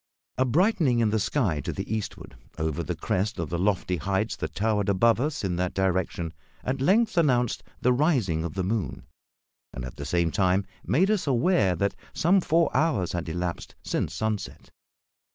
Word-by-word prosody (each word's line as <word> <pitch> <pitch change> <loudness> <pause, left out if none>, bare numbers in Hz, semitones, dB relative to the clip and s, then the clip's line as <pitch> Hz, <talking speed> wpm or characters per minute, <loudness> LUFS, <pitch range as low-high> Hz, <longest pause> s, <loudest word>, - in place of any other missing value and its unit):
A 130 - +4
brightening 160 - +3
in 115 -3 +2
the 110 - +1
sky 105 - 0
to - - -3
the 110 - -3
eastward, 110 - -6 0.2
over 80 -2 -1
the - - -3
crest 100 +3 -1
of 85 -3 -4
the 85 - -1
lofty 95 -2 +1
heights 95 +7 -1
that - - -5
towered 105 -1 +1
above 115 +4 +4
us 145 -3 -2
in 90 -3 -1
that 90 0 -1
direction, 95 -3 -1 0.3
at 130 +1 -2
length 210 +5 +3
announced 125 -7 +2 0.2
the 125 +1 +4
rising 120 - +1
of 85 -3 -5
the 95 - -1
moon, 105 +1 -2 0.7
and, 60 - -6
at 65 - -9
the 70 - -5
same 85 +2 +1
time, 95 -1 +2 0.2
made 185 - +2
us 205 -7 0
aware 120 - +3
that 100 +4 0 0.2
some 185 +4 +3
four 165 0 +2
hours 130 - +1
had 85 -1 -3
elapsed 85 +1 -4
since - - -2
sunset. 110 -2 -3
105 Hz, 180 wpm, -26 LUFS, 90-135 Hz, 0.7 s, A